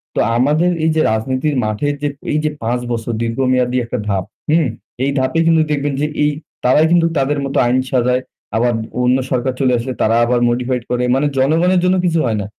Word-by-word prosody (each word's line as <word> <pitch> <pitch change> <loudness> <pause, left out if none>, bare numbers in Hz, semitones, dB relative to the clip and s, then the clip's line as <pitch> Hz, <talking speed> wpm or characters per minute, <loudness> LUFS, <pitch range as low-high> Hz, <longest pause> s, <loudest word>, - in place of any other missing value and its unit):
তো - - 0 0.2
আমাদের 150 +8 +2
এই - - +3
যে 160 - +3
রাজনীতির 130 +6 -1
মাঠে 110 +6 -2
যে 145 - 0 0.2
এই 150 - +1
যে 155 - +1
৫ 120 +2 0
বছর 115 0 -2
দীর্ঘমেয়াদী 125 +1 0
একটা 120 - -4
ধাপ, 100 -3 0 0.3
হুম? 160 -1 +3 0.4
এই 140 - +1
ধাপে 130 +5 0
কিন্তু 165 -1 +4
দেখবেন 145 -1 -1
যে 150 - +1 0.2
এ - - +4 0.4
তারাই 140 +5 +4
কিন্তু 170 -1 +4
তাদের 140 +1 0
মতো 135 - -3
আইন 125 +2 +2
সাজায়। 125 0 +2 0.3
আবার 120 +2 +2 0.3
অন্য 125 +1 +3
সরকার 130 +1 0
চলে 130 -2 +2
আসলে 125 +2 -4
তারা 110 +1 +3
আবার 120 +1 +1
modified 125 0 -1
করে 125 0 0
মানে 140 +2 +1
জনগণের 165 +7 +3
জন্য 180 +1 +3
কিছু 165 -2 +1
হয় 110 -3 0
না। - - -4
130 Hz, 200 wpm, -17 LUFS, 120-150 Hz, 0.4 s, কিন্তু